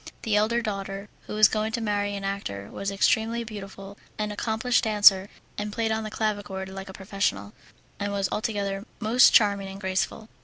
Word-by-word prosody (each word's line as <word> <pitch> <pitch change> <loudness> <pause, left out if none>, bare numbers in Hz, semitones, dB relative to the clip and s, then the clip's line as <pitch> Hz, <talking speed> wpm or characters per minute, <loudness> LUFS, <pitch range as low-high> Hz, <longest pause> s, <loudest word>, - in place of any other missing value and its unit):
The 220 -2 +1
elder 230 +3 +2
daughter, 195 -1 -4 0.2
who - - -5
was 215 -1 +7
going 215 0 -1
to 235 - 0
marry 205 -2 -1
an 200 - -5
actor, 195 - -4
was 195 - -3
extremely 220 +4 +1
beautiful, 200 -2 -9 0.2
an 210 0 -2
accomplished 220 +4 0
dancer, 205 -2 +6 0.3
and 210 0 -3
played 225 +1 -1
on 220 0 -1
the 215 - -4
clavichord 205 -3 -3
like 195 0 -8
a - - -6
professional, 190 - -2 0.5
and 205 0 -2
was 200 -1 0
altogether 200 -1 -2
most 235 +2 +6
charming 200 -2 +4
and 195 0 -8
graceful. 190 +3 -2
205 Hz, 180 wpm, -26 LUFS, 195-220 Hz, 0.5 s, was